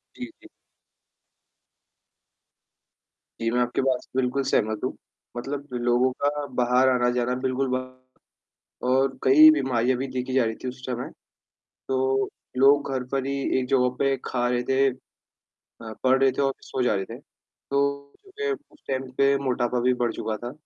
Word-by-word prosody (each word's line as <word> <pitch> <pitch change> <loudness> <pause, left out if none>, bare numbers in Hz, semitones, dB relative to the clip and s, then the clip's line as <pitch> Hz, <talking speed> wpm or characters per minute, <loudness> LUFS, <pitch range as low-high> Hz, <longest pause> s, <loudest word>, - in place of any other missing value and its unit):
जी, 250 - -6 0.2
जी। 335 - -15 2.9
जी, 115 - +1
मैं 125 - +1
आपकी 120 +2 0
बात 130 -1 +1
से - - -24
बिल्कुल 130 +2 0
सहमत 110 -4 0
हूँ, 130 - -1 0.4
मतलब 140 +3 -5
लोगों 120 +2 +2
का 145 0 0
बाहर 125 +1 +3
आना-जाना 125 0 +1
बिल्कुल 130 +1 0
बंद 130 0 -7 0.9
और 130 0 +2
कई 155 +4 +8
बीमारियाँ 130 -4 +1
भी 135 - -2
देखी 130 0 -4
जा 130 -3 +4
रही 110 0 -2
थी - - -2
उस 130 +1 -9
समय, 125 -1 -4 0.8
तो 130 0 +1 0.3
लोग 140 +1 +4
घर 130 -1 -1
पर 135 -1 -1
ही 140 - -1 0.3
एक 125 - -3
जगह 125 -2 +3
पे 135 0 +2
खा 120 -1 -1
रहे 125 0 0
थे, 135 +1 +4 0.7
अ, 110 -1 -11
पढ़ 130 +1 +4
रहे 135 -1 +5
थे 135 - -2
और 135 -1 +1 0.2
सो 130 - -2
जा 110 - +2
रहे 95 -1 -2
थे, - - -9
तो 140 0 -4
कि 430 +2 -3
उस 320 -6 -9
टाइम 130 -1 -3
पे 140 0 +4
मोटापा 125 -1 0
भी 125 +1 +2
बढ़ 120 - +1
चुका 110 0 -2
था। 120 +3 -5
130 Hz, 165 wpm, -25 LUFS, 125-135 Hz, 2.9 s, कई